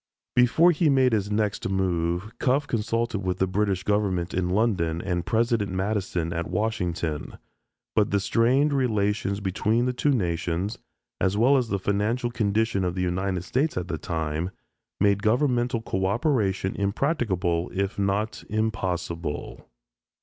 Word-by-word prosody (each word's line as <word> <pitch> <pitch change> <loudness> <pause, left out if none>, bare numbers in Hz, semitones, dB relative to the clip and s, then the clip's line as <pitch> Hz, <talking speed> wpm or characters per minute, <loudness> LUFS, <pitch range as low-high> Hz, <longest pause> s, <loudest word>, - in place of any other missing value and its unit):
Before 125 +8 +5
he 165 -1 +2
made 130 -3 +4
his 100 -2 0
next 105 -2 -1
move, 90 +1 -1
Cuffe 140 +3 +2
consulted 115 -2 -1
with 90 -2 -2
the 95 - +2
British 95 0 0
Government 95 -4 0
in 90 -1 0
London 90 -5 +1
and 85 -1 -2
President 115 -3 +1
Madison 95 -3 -1
at 85 -1 -3
Washington. 90 -6 -2 0.6
But 105 -1 +3
the 100 - +2
strained 130 +8 +2
relations 105 -5 0
between 105 +5 +1
the 125 - 0
two 135 +4 0
nations, 90 -3 -1 0.4
as 95 +1 +1
well 125 +6 +5
as 125 -4 +1
the 100 - 0
financial 105 +6 0
condition 110 -3 +1
of 90 -1 -1
the 90 - -1
United 90 0 -1
States 135 - 0
at 90 0 -3
the 80 - -3
time, 80 +1 -2 0.5
made 100 0 +3
governmental 120 0 +1
coöperation 95 -1 0
impracticable 100 - 0
if 100 +1 -2
not 100 +2 -1
impossible. 90 -7 -3
100 Hz, 140 wpm, -25 LUFS, 90-115 Hz, 0.6 s, Before